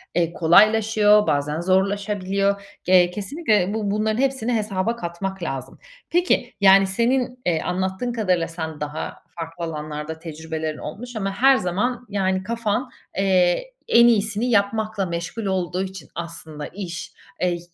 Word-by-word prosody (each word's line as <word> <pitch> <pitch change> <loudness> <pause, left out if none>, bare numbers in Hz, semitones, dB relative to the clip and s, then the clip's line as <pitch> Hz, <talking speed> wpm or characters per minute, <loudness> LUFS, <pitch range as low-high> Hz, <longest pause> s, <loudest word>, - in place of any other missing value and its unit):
eee, 170 -1 +1
kolaylaşıyor, 210 +4 +5
bazen 150 +2 0
zorlaşabiliyor. 200 +1 +1 0.2
Ge 180 -1 +5
kesinlikle 210 - 0
bu 210 -2 -1
bunların 215 +1 0
hepsini 260 -3 0
hesaba 215 0 -1
katmak 190 -1 -5
lazım. 135 -5 -5 0.3
Peki, 340 -8 +1
yani, 195 0 +7
senin, 250 +5 0
eee, 165 -3 +1
anlattığın 190 +6 -2
kadarıyla 185 -7 +1
sen 160 -2 -6
daha 150 +1 -5 0.2
farklı 165 +1 -6
alanlarda 155 0 -5
tecrübelerin 160 -1 -5
olmuş 240 +10 -8
ama 195 -2 -2
her 265 +5 +5
zaman, 240 +7 -1
yani, 190 -2 0
kafan, 230 +3 -1 0.3
eee, 190 - +2 0.2
en 235 - +6
iyisini 215 0 +2
yapmakla 215 -1 +1
meşgul 170 +6 -4
olduğu 185 -1 -1
için 190 -1 -8
aslında 160 -3 -7
iş, 180 -4 -7 0.3
eee 180 - +3
y 175 -1 -2
195 Hz, 135 wpm, -23 LUFS, 170-220 Hz, 0.3 s, yani